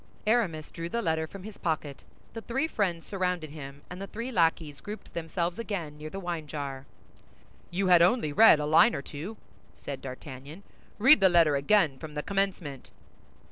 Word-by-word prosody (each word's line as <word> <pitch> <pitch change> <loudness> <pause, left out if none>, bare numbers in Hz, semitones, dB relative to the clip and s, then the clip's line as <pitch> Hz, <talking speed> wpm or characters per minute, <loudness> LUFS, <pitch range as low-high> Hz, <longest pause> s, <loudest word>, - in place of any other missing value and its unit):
Aramis 200 -9 +1
drew 170 0 -5
the 235 +5 -2
letter 160 -2 0
from 195 +3 -10
his 215 0 -10
pocket; 150 -4 -3 0.3
the 225 - -6
three 265 +7 -1
friends 180 - -1
surrounded 180 -5 -2
him, 140 -2 -9
and 180 +2 -8
the 195 - -5
three 230 +5 -5
lackeys 165 - +1
grouped 210 +1 -9
themselves 170 +2 -3
again 180 -10 -4
near 155 +1 -6
the 195 - -6
wine 170 -4 -4
jar. 140 -2 -6 0.8
"You 190 +3 -1
had 180 -2 +6
only 175 -4 +3
read 215 -4 +7
a 150 - -1
line 160 +10 +5
or 140 - -4
two," 170 +12 -7 0.4
said 140 -2 -7
D'Artagnan; 135 +6 -9 0.3
"read 265 +7 +7
the 190 -1 +6
letter 165 -4 +5
again 145 -1 +2
from 155 -2 -9
the 150 - -3
commencement." 190 -9 -2
170 Hz, 180 wpm, -28 LUFS, 150-195 Hz, 0.8 s, read